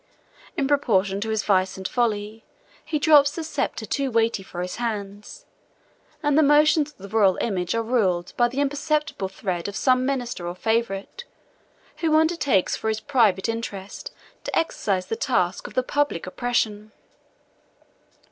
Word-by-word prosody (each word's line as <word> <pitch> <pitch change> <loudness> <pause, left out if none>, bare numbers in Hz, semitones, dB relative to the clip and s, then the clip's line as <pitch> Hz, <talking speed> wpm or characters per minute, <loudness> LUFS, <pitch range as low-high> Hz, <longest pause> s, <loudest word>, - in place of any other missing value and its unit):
In 275 -4 +1
proportion 205 -9 +1
to 220 - -3
his 220 0 0
vice 190 -2 +1
and 190 -1 -4
folly, 220 -2 -1 0.4
he 315 -1 -2
drops 290 -2 +6
the 330 - -4
sceptre 315 - -3
too 275 -1 -1
weighty 230 -3 +1
for 180 -2 -6
his 180 - -5
hands; 210 -3 -5 0.8
and 295 -1 +2
the 315 - +6
motions 300 +1 +4
of - - -32
the 200 - -10
royal 200 -2 +3
image 185 -3 -1
are 230 - 0
ruled 190 -7 0
by 240 - +3
the 260 +4 -2
imperceptible 290 -5 -1
thread 185 -2 -4
of 200 - -6
some 255 +3 +3
minister 245 -9 -2
or 175 - -4
favorite, 225 - -2 0.7
who 320 -2 +1
undertakes 315 - +2
for - - -5
his 220 0 0
private 220 -8 +2
interest 210 -4 -5 0.3
to - - -2
exercise 195 - 0
the 225 - -3
task 190 -8 0
of - - -13
the 255 - +2
public 290 - -1
oppression. 215 0 -2
225 Hz, 155 wpm, -24 LUFS, 195-280 Hz, 0.8 s, drops